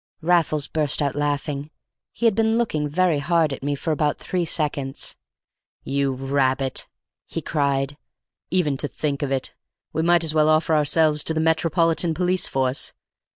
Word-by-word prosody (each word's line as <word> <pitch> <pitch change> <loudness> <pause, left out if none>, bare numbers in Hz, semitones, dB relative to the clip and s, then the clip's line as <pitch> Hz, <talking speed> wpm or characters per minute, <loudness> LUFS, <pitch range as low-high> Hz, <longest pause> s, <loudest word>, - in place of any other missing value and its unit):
Raffles 160 -4 +2
burst 150 -3 0
out 140 -2 0
laughing; 145 0 -2 0.4
he 235 - -4
had 225 - +5
been 225 +1 +2
looking 155 -11 -1
very 170 -1 +2
hard 160 -1 +1
at - - -7
me 145 +1 -1
for 160 +3 -3
about 150 -1 0
three 180 -2 -2
seconds. 145 -4 -1 0.7
"You 140 0 0
rabbit," 135 0 0 0.4
he - - -4
cried, 140 -1 -1 0.5
"even 160 -7 +1
to 145 - -1
think 145 -1 -3
of 140 -2 -2
it! 135 -1 -2 0.4
We 160 - 0
might 170 0 +3
as 160 -1 +2
well 155 0 +3
offer 155 +1 +3
ourselves 150 0 +3
to 160 - +1
the - - 0
Metropolitan 165 +1 +2
Police 180 +1 +1
Force. 130 0 0
150 Hz, 160 wpm, -23 LUFS, 140-165 Hz, 0.7 s, had